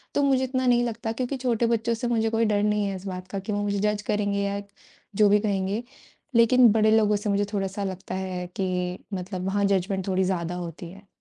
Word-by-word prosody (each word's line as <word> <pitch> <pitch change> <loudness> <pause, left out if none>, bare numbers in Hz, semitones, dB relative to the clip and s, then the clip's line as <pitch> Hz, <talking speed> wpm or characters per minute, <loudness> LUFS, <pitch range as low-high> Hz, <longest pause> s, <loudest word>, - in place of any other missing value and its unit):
तो 285 - +3
मुझे 265 -2 +3
इतना 260 0 -1
नहीं 240 0 +4
लगता 230 -1 -3
क्योंकि 255 +3 -3
छोटे 240 -2 0
बच्चों 230 0 +1
से 230 +2 -3
मुझे 225 -2 +1
कोई 225 0 +1
डर 205 -1 +1
नहीं 210 0 +1
है 195 -1 -2
इस 190 +1 -9
बात 185 0 -6
का 195 +1 -4
कि 195 +3 -5
वो 205 - -1
मुझे 200 -1 -1
जज 210 0 0
करेंगे 205 -1 0
या 200 0 -2 0.5
जो 210 0 +5
भी 205 +1 +5
कहेंगे, 200 +1 -1 0.5
लेकिन 235 0 +6
बड़े 215 0 +3
लोगों 210 -1 +3
से 205 +1 -2
मुझे 200 0 +1
थोड़ा-सा 195 0 -2
लगता 185 -1 -5
है 185 -1 -4
कि 180 -1 -1 0.2
मतलब 185 0 -4
वहाँ 200 +1 +1
जजमेंट 190 0 0
थोड़ी 190 0 +1
ज़्यादा 180 -2 -1
होती 170 -1 -6
है। 195 +1 -15
205 Hz, 225 wpm, -25 LUFS, 190-225 Hz, 0.5 s, लेकिन